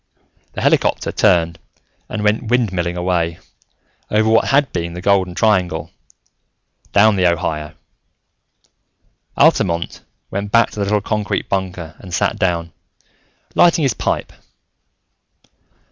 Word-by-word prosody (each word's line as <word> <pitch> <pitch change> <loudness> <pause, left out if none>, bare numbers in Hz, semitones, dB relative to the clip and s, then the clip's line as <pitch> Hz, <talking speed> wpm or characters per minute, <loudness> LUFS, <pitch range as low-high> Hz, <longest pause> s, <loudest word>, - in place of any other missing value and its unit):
The - - -5
helicopter - - +1
turned 85 -1 +2 0.5
and 105 -1 -4
went 105 +2 +1
windmilling 95 -8 0
away, 85 -2 -1 0.7
over 110 +1 +2
what 110 0 +4
had 140 -2 +2
been 85 -1 -3
the - - -5
Golden 95 -2 +1
Triangle, 90 -8 +1 1.0
down 105 0 +4
the 90 -2 +4
Ohio. 75 -2 -3 1.6
Altamont 85 -2 +2 0.3
went 100 +1 -4
back 115 0 +4
to - - -8
the 100 - 0
little 105 +1 +1
concrete 105 -1 -2
bunker 90 -4 -3
and 90 -3 -6
sat - - 0
down, 85 -2 -1 0.8
lighting 170 -2 +4
his 135 -5 +2
pipe. - - -2
95 Hz, 115 wpm, -18 LUFS, 85-105 Hz, 1.6 s, what